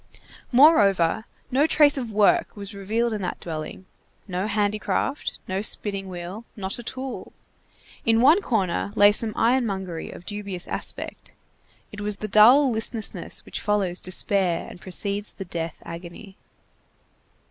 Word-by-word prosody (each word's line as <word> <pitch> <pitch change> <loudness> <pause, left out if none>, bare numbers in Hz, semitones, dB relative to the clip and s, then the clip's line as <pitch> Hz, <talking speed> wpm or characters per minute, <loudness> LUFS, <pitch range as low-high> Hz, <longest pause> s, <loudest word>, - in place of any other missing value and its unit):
Moreover, 220 - +5 0.3
no 280 +5 +3
trace 295 -2 +5
of 245 -5 -3
work 210 -1 +3
was 200 +1 -7
revealed 220 +4 -1
in 210 - -3
that 180 - -4
dwelling; 160 +2 -6 0.4
no 185 +1 -2
handicraft, 210 +6 -1
no 190 +1 -2
spinning 200 -2 0
wheel, 180 +4 -7
not 195 0 -5
a - - -7
tool. 260 +3 -6 0.7
In 225 0 +3
one 300 - +6
corner 200 - -1
lay 205 0 +7
some 215 +1 0
ironmongery 200 -8 0
of 175 - -11
dubious 200 -3 -5
aspect. - - -6 0.6
It 210 - -8
was 205 -1 -1
the 215 - -5
dull 245 +7 +6
listlessness 225 0 -3
which - - -5
follows 200 -4 0
despair 185 -1 +1
and - - -12
precedes 200 +2 -2
the 195 - -7
death 165 -2 -5
agony. 170 +4 -9
205 Hz, 135 wpm, -24 LUFS, 185-225 Hz, 0.7 s, lay